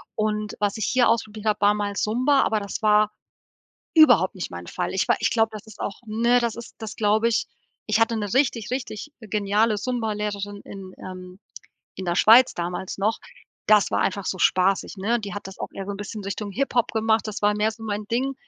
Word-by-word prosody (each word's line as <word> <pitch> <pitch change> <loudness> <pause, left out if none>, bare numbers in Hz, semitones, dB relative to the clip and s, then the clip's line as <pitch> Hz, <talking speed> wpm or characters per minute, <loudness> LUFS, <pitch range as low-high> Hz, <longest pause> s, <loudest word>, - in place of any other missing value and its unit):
Und, 215 -1 -2
was 205 +1 0
ich 220 - -1
hier 250 -3 +3
ausprobiert 215 -1 -1
habe 215 -1 +1
war 205 0 +4
mal 205 -1 -3
Zumba. 255 +7 +2
Aber 215 - +1
das 200 -1 -5
war, 210 0 +4 0.8
überhaupt 245 - +6
nicht 185 - -5
mein 85 0 -8
Fall. - - -3
Ich 190 - 0
war - - +4
ich 225 - +1
glaub, 225 -1 +2
das 215 -2 -9
ist 220 - -14
auch 200 - -4
ne, 235 +3 +2
das 235 -2 -1
ist 235 - -10
das 220 -2 -7
glaube 215 +1 +2
ich. 225 - 0 0.4
Ich 215 0 +2
hatte 225 0 +2
'ne 205 -3 -3
richtig, 255 -5 +1
richtig 255 +1 -5
geniale 210 +1 +1
Zumba 230 -1 -2
Lehrerin 205 -1 -4
in 190 -2 -9
ähm, 185 0 -9 0.6
in 190 - -4
der 175 -1 0
Schweiz 235 +7 +7
damals 180 +3 -4
noch. 215 +3 +1 0.5
Das 210 -1 +5
war - - +1
einfach 195 0 -1
so - - -1
spaßig, 185 +3 +2
ne? 225 +5 +1
Die 205 -3 -6
hat 205 -1 -6
das 190 - -11
auch - - -5
eher 195 - -6
so 200 - -3
'n - - -6
bisschen 205 +1 -6
Richtung 200 +1 -4
Hip-Hop 250 0 0
gemacht, 220 -1 +1
das 215 -1 -5
war 205 0 +3
mehr 210 +1 +2
so 225 0 -12
mein 210 -1 -3
Ding. 260 +4 0
215 Hz, 220 wpm, -24 LUFS, 200-225 Hz, 0.8 s, Schweiz